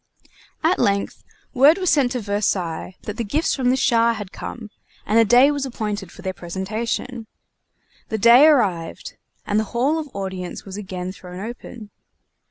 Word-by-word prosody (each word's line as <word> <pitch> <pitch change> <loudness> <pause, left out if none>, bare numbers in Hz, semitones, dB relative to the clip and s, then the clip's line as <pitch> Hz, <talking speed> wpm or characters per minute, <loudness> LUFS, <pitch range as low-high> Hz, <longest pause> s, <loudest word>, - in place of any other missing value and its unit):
At 335 +4 +2
length, 200 0 0 0.3
word 285 +5 +6
was 370 -2 +1
sent 275 -4 +2
to 250 - -2
Versailles 190 -4 -2
that 210 0 -6
the 235 - -1
gifts 290 +10 0
from 255 -2 +1
the 255 - +3
Shah 235 -3 +3
had 205 -4 -7
come, 220 -3 -8 0.3
and 220 +2 +3
a - - +7
day 245 +6 +5
was 285 -1 -2
appointed 210 -7 -4
for - - -13
their 190 - -2
presentation. 220 +7 -4 0.8
The 220 - -1
day 235 +7 +7
arrived, 185 - 0 0.3
and 210 +1 +1
the - - +1
Hall 285 +7 +2
of 300 -2 -6
Audience 190 -2 -5
was 195 -1 -8
again 185 -3 -5
thrown 180 -1 -10
open. 225 0 -8
220 Hz, 170 wpm, -22 LUFS, 195-255 Hz, 0.8 s, a